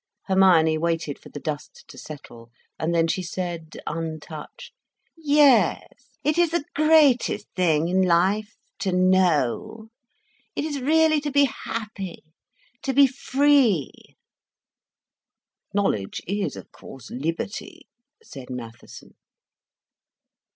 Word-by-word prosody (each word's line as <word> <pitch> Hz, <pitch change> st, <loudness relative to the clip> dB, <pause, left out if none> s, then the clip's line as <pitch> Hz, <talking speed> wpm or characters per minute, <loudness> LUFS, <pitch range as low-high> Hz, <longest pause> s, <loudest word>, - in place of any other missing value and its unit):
Hermione 175 Hz, -5 st, +4 dB
waited 165 Hz, -3 st, -2 dB
for -, -, -14 dB
the 145 Hz, -, -8 dB
dust 150 Hz, 0 st, -6 dB
to -, -, -13 dB
settle, 120 Hz, -6 st, -11 dB, 0.3 s
and 160 Hz, -, -1 dB
then 165 Hz, -1 st, +2 dB
she 185 Hz, -, -1 dB
said, 170 Hz, -2 st, -5 dB
untouched: 155 Hz, -1 st, -7 dB, 0.4 s
"Yes, 290 Hz, -5 st, +2 dB
it 305 Hz, +3 st, +1 dB
is 345 Hz, -1 st, +4 dB
the 330 Hz, -2 st, -2 dB
greatest 295 Hz, -8 st, +3 dB
thing 165 Hz, -3 st, +2 dB
in 185 Hz, +2 st, +2 dB
life—to 190 Hz, +2 st, 0 dB
know. 185 Hz, -, +1 dB, 0.7 s
It -, -, -2 dB
is 290 Hz, -3 st, -4 dB
really 310 Hz, +2 st, +3 dB
to 295 Hz, -, -3 dB
be 285 Hz, 0 st, +4 dB
happy, 215 Hz, -7 st, -5 dB, 0.6 s
to 270 Hz, -, -2 dB
be 280 Hz, 0 st, +7 dB
free." 270 Hz, -, +2 dB, 1.8 s
"Knowledge 150 Hz, -, -1 dB
is, 200 Hz, +2 st, -2 dB
of -, -, -11 dB
course, 135 Hz, -4 st, -13 dB
liberty," 165 Hz, +9 st, -5 dB, 0.4 s
said 135 Hz, -3 st, -11 dB
Mattheson. 120 Hz, -2 st, -10 dB
185 Hz, 110 wpm, -24 LUFS, -, 1.8 s, be